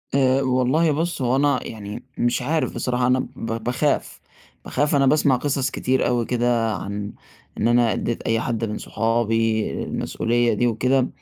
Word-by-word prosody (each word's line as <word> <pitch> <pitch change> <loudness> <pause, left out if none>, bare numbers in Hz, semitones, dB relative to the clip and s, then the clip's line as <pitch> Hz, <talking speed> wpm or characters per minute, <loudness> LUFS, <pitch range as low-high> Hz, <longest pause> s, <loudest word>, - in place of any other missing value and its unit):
آآ، 135 -1 +3
والله 130 +5 +2
بُص، 165 +1 -2
هو 125 0 +2
أنا 140 -1 +2
يعني 105 -2 -7
مش 120 0 +1
عارف 160 +1 -1
بصراحة 125 -1 0
أنا 130 +1 +3
ب 115 -2 -5
باخاف 135 +4 -1 0.4
باخاف، 145 +2 0
أنا 135 -1 +4
باسمع 145 -1 +4
قِصص 135 0 -1
كتير 130 +1 0
أوي 120 -2 +1
كده 120 -2 +1
عن 100 +1 -5 0.4
إن 115 - +1
أنا 120 -1 +3
إدّيت 120 - -2
أي 115 0 0
حد 115 -1 -2
من 105 -1 -4
صحابي 115 0 0
المسؤولية 120 0 -1
دي 120 +3 +1
وكده، 125 +3 +1
120 Hz, 160 wpm, -22 LUFS, 115-135 Hz, 0.4 s, أنا